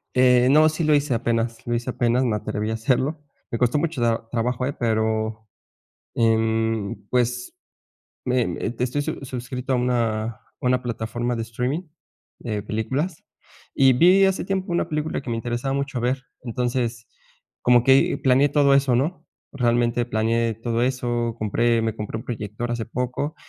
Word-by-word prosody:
Eh, 125 -1 +5
no. 155 +2 +6
Sí 155 +2 -3
lo 155 -1 +4
hice 145 -2 +1
apenas 115 0 -1
lo 120 - 0
hice 120 +2 -3
apenas 120 +1 +1
me 115 -4 +1
atreví 105 +1 -3
a - - -1
hacerlo. 130 +7 0 0.3
Me 115 - -1
costó 125 +4 +2
mucho 160 -3 -1
tra 115 -1 0
trabajo, 125 +1 -1
eh, 140 - -2
pero, 110 -1 -1 0.7
mm, 110 -2 +1 0.2
pues 125 0 0 0.7
me 125 -1 +1
me - - -3
estoy 125 +4 0
sus 145 -3 -5
suscrito 125 +1 -4
a - - +3
una 120 -3 0
a 115 -2 -7 0.2
una 125 0 +1
plataforma 120 0 -3
de 115 - -2
streaming 125 +8 -2 0.6
de 105 -3 -4
películas 130 - -3 0.5
y 135 -1 +5
vi 185 +8 +6
hace 190 0 0
tiempo 190 0 -2
una 170 - 0
película 155 0 -2
que 125 - -6
me 115 - -1
interesaba 120 +3 -2
mucho 140 -2 -2
ver. 130 +3 -1 0.2
Entonces 120 -1 -2 0.6
como 120 -1 +5
que 135 +1 +4
planeé 135 +2 +4
todo 140 -2 +4
eso, 140 -2 +3
¿No?, 155 +9 -2 0.3
realmente 120 -2 +1
planeé 115 0 0
todo 115 +1 -2
eso. 120 -2 -1
Compré 115 +2 +1
me 110 -1 -1
compré 105 +1 -4
un - - -9
proyector 110 0 -4
hace 120 -1 -2
poco 125 +5 -3
120 Hz, 165 wpm, -23 LUFS, 115-130 Hz, 0.7 s, no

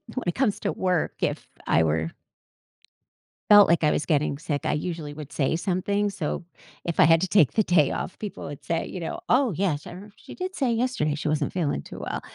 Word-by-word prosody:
when 255 - -3
it 175 - 0
comes 250 -7 0
to - - -1
work, 180 -3 0
if - - -2 0.2
I 80 - +4
were 80 +1 0 1.4
felt 205 -1 +9
like 170 -1 +3
I 150 - +4
was - - -1
getting 145 -3 +1
sick, 145 -2 -3
I - - +1
usually 155 -1 -3
would 150 -1 -9
say 140 +1 0
something, 195 +4 0
so 175 -4 -3 0.4
if 170 - -3
I - - +7
had 165 0 +5
to 190 - -1
take 175 -9 +4
the 215 - +3
day 165 -7 +3
off, - - -4
people 210 -2 -6
would 140 -1 -9
say, 165 0 -1
you 185 - -6
know, 165 - -4
"Oh, 255 -3 +3
yes, 165 -4 -1
I - - -7
remember 200 +3 -11
she - - -12
did 370 0 -5
say 255 -4 +1
yesterday 230 - 0
she 150 0 -3
wasn't 150 -1 0
feeling 155 - -1
too - - -10
well." - - -4
170 Hz, 225 wpm, -25 LUFS, 150-200 Hz, 1.4 s, felt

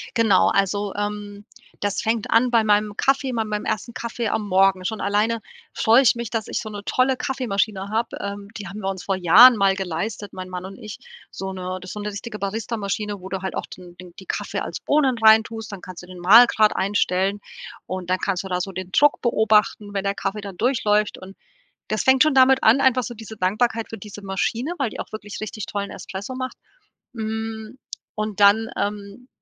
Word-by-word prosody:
Genau, 220 -5 +4
also 200 +1 0
ähm, 205 0 -5 0.3
das 205 -1 -1
fängt 225 -1 -1
an 240 +2 +4
bei 230 -2 +3
meinem 210 0 +1
Kaffee 270 0 +1
bei 225 -2 -1
meinem 210 -1 -3
ersten 220 +2 -3
Kaffee 235 -1 -4
am 210 0 -1
Morgen. 190 -1 +3
Schon 220 +3 -3
alleine 215 +3 +1 0.3
freue 230 +4 +5
ich 260 - +4
mich, 235 -2 -5
dass 225 -2 -3
ich - - -2
so 220 - -7
'ne 205 -1 -8
tolle 255 +4 +1
Kaffeemaschine 215 -7 -2
habe. 225 +2 -2
Ähm, 200 0 -6
die 205 -2 -7
haben 210 +2 -8
wir 195 - -2
uns 190 -2 -5
vor 195 - 0
Jahren 205 +8 +8
mal 195 -2 +3
geleistet, 195 +2 -4
mein 185 0 -7
Mann 180 0 -6
und 195 +1 -9
ich, 215 -3 -9 0.3
so 190 0 -5
'ne 185 0 -5
das 185 - -9
ist - - -6
so 210 - -6
'ne 210 - -3
richtige 210 +2 -7
Barista 215 +4 -3
Maschine, 205 -1 -3
wo 190 - -8
du 190 -1 -4
halt 190 - -4
auch - - -3
den 175 -1 -13
den 180 -1 -12
die 190 - -12
Kaffee - - -3
als - - -5
Bohnen 275 -4 +2
reintust, 220 0 +3
dann 200 - -7
kannst 180 -1 -10
du - - -13
den 180 -1 -11
Mahlgrad 215 +3 +6
einstellen 195 0 0 0.5
und 185 -1 -6
dann 185 0 +1
kannst 190 -2 -1
du 190 - -7
da 180 -1 -1
so 195 +2 -4
den 185 0 -6
Druck 290 +7 +3
beobachten, 215 -3 +2
wenn 195 -1 -2
der 200 0 0
Kaffee 200 +2 -3
dann 200 -3 -9
durchläuft 210 -3 +1
und 190 +1 -12 0.5
das 215 - -1
fängt 265 +1 +5
schon 310 -1 +2
damit 265 0 +5
an, 225 +5 +6
einfach 260 -2 +3
so 240 - -6
diese 220 -1 -10
Dankbarkeit 220 +4 0
für 225 - -7
diese 205 0 -10
Maschine, 215 - -2
weil 270 -6 0
die - - -6
auch - - -10
wirklich 210 -1 -7
richtig 215 0 -5
tollen 200 -1 -4
Espresso 195 +6 -7
macht. 255 0 -5 0.6
Hm, 220 +1 -5 0.4
und 215 -1 -4
dann, 205 +3 +5
ähm, 205 +4 -4
210 Hz, 215 wpm, -22 LUFS, 195-225 Hz, 0.6 s, Jahren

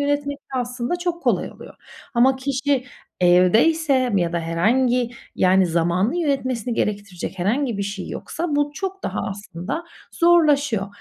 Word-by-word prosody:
yönetmek 285 0 -1
de 265 -2 -5
aslında 245 +5 -2
çok 350 -1 -3
kolay - - +1
oluyor. - - -13 0.4
Ama 260 +3 +4
kişi 270 0 -1 0.4
evdeyse 245 - +4
ya 175 -3 +1
da 170 - 0
herhangi, 235 +9 +1 0.2
yani, 185 0 +4
zamanı 175 - +1
yönetmesini 260 -7 -1
gerektirecek 200 -4 -3
herhangi 230 +5 0
bir - - 0
şey 200 -1 -5
yoksa, 325 -3 -3
bu 290 0 +1
çok 385 +1 -5
daha - - -3
aslında 200 - -5 0.3
zorlaşıyor. 295 - +3
250 Hz, 135 wpm, -22 LUFS, 195-285 Hz, 0.4 s, Ama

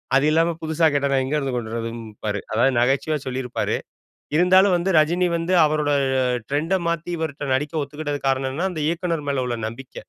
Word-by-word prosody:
அது 135 - +4
இல்லாம 165 +1 +2
புதுசா 160 +1 +1
கேட்டா, 140 0 +1
நான் 135 -1 +2
எங்கருந்து 135 -1 -1
கொண்டு 115 -2 -4
வரதும் 115 0 -4 0.2
பாரு. 105 -1 -1
அதாவது 125 +5 +3
நகைச்சுவையா 135 +5 +1
சொல்லியிருப்பாரு. 125 -1 -2 0.6
இருந்தாலும் 185 +3 +5
வந்து 175 +3 -1
ரஜினி 175 +4 +2
வந்து 170 +3 -1
அவரோட 150 -1 0 0.6
ட்ரெண்ட 155 +6 0 0.2
மாத்தி, 170 +1 -3
இவர்ட்ட 145 -3 -3
நடிக்க 150 +3 -2
ஒத்துக்கிட்டதுக்கு 145 -1 -4
காரணம் 135 0 0
என்னன்னா, 175 +8 -1
அந்த 155 - -4
இயக்குனர் 170 -3 -2
மேல 130 -2 0
உள்ள 120 -1 -2
நம்பிக்க. 125 +3 -12
145 Hz, 170 wpm, -22 LUFS, 130-165 Hz, 0.6 s, இருந்தாலும்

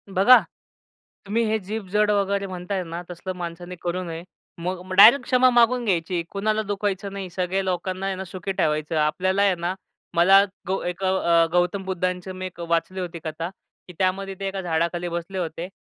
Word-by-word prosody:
बघा, 245 +7 +8 0.9
तुम्ही 225 +4 0
हे 220 0 +1
जीभ 205 +1 -6
जड 210 0 +3
वगैरे 200 -1 0
म्हणताय 185 +1 -4
ना, 170 +1 -6
तसलं 175 +2 -6
माणसाने 175 +1 -6
करू 180 +1 -2
नये. 165 0 -6 0.4
मग 180 +1 -3
मग 185 - -6
डायरेक्ट 230 +7 +9
क्षमा 255 0 +4
मागून 240 0 +3
घ्यायची, 175 -2 0
कुणाला 215 +2 0
दुखायचं 200 -1 -2
नाही. 195 -2 -5
सगळ्या 185 +2 -1
लोकांना, 185 +1 -2
हे 190 - -2
ना, 190 - -5
सुखी 185 +1 -5
ठेवायचं. 155 +1 0
आपल्याला 185 +6 +1
आहे 195 -3 +4
ना, 175 +2 -2 0.4
मला 195 +3 +7 0.2
गौ 190 +1 -1
एक 180 +2 -4
गौ 190 0 +2
अ, 170 -2 +4
गौतम 180 +2 +1
बुद्धांची 185 0 -2
मी 185 0 -6
एक 175 -2 -9
वाचली 170 +2 -1
होती 175 -2 -5
कथा, 165 +2 -4 0.4
की 180 - -11
त्यामध्ये 195 +1 0
ते 195 - -3
एका 195 0 -3
झाडाखाली 170 0 -1
बसले 170 +3 -5
होते 170 0 -4
185 Hz, 185 wpm, -24 LUFS, 175-195 Hz, 0.9 s, डायरेक्ट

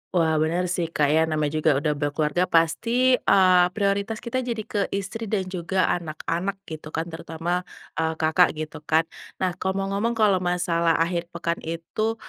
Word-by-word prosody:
Wah, 165 -2 +3
benar 165 +3 +1
sih 170 -2 -1
Kak 145 -1 +3
ya. 160 +1 +4
Namanya 155 -2 0
juga 155 - +3
udah 150 +1 0
berkeluarga, 150 +3 0
pasti, 235 +10 +3
eee, 185 -2 +5
prioritas 200 +2 -1
kita 250 +2 -2
jadi 235 -3 -3
ke 205 - -3 0.2
istri 200 +3 -4
dan 200 -2 0
juga 185 +1 0 0.2
anak-anak, 170 +4 -3
gitu 155 -3 -8
kan. 165 +1 -3
Terutama, 170 +2 -3 0.3
eee, 160 0 +1
Kakak, 160 +2 +3
gitu 155 0 -6
kan. 160 +2 +4 0.3
Nah, 185 -1 0
kalau 190 0 -1
mau - - -3
ngomong, 225 +4 0
kalau 210 -4 +3
masalah 175 -2 +1
akhir 170 +1 0
pekan 170 -1 -3
itu, 165 +7 -3
175 Hz, 170 wpm, -24 LUFS, 160-200 Hz, 0.3 s, eee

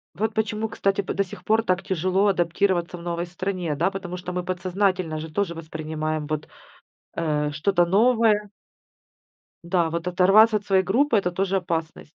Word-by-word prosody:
Вот 215 +4 -1
почему, 220 0 -1
кстати, 195 -2 0
п - - -4
до 200 - +2
сих 200 +3 -12
пор 220 +1 +3
так 185 -3 0
тяжело 185 +1 +1
адаптироваться 175 0 0
в 170 - -11
новой 170 0 -3
стране, 180 -2 -3
да, 170 +6 +1
потому 185 -2 -6
что 180 0 -6
мы 180 0 -2
подсознательно 185 -2 -1
же 160 0 -7
тоже 190 0 -1
воспринимаем 155 -1 -4
вот, 155 0 -4 0.7
э, 150 -3 0
что-то 175 +3 +2
новое 215 +1 +3 1.1
Да, 170 -2 +1
вот 170 +1 -3
оторваться 195 +5 +5
от 205 - -4
своей 190 -1 +3
группы 235 +7 +2
это 180 -3 0
тоже 195 +2 0
опасность. 165 -3 -4
180 Hz, 170 wpm, -24 LUFS, 170-200 Hz, 1.1 s, оторваться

